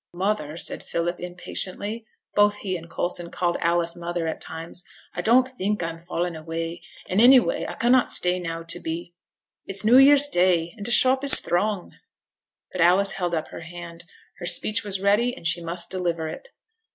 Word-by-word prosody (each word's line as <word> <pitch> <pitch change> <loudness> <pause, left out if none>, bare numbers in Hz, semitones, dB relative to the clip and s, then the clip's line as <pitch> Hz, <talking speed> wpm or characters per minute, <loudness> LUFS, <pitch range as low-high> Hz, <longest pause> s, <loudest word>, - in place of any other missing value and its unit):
'Mother,' 175 -5 -2
said - - -1
Philip, 175 +1 -3
impatiently 185 +5 -1 0.3
(both 205 0 +3
he 195 -3 -4
and 165 -1 -9
Coulson 175 0 -4
called 175 0 -2
Alice 170 0 0
'mother' 175 -1 -4
at 160 - -5
times), 165 +2 -8 0.3
'I 175 - -4
don't 245 +6 +3
think 210 -6 -3
I 165 - -3
am 165 - -12
fallen 175 0 -4
away, 165 +2 -6 0.3
and 190 +4 +1
any 255 +2 +8
way - - -3
I - - -7
cannot 245 +2 +2
stay 180 0 +3
now 165 -1 -5
to 165 - -3
be 170 +2 -6 0.5
it's 195 +2 -2
new 245 +4 +6
year's 285 +1 +6
Day, 175 - +1
and 210 - -9
t' - - -3
shop 260 +2 +3
is 280 - +10
throng.' 195 +1 -2 0.7
But 185 - -4
Alice 185 +4 +3
held 175 -3 -3
up 160 - -4
her - - -9
hand. 170 +1 -10 0.3
Her 175 - -5
speech 215 +5 +2
was 200 -2 -2
ready, 230 +6 +1
and - - -13
she 165 +1 +1
must 170 +1 -4
deliver 170 -3 -2
it. - - -10
180 Hz, 190 wpm, -23 LUFS, 170-210 Hz, 0.7 s, is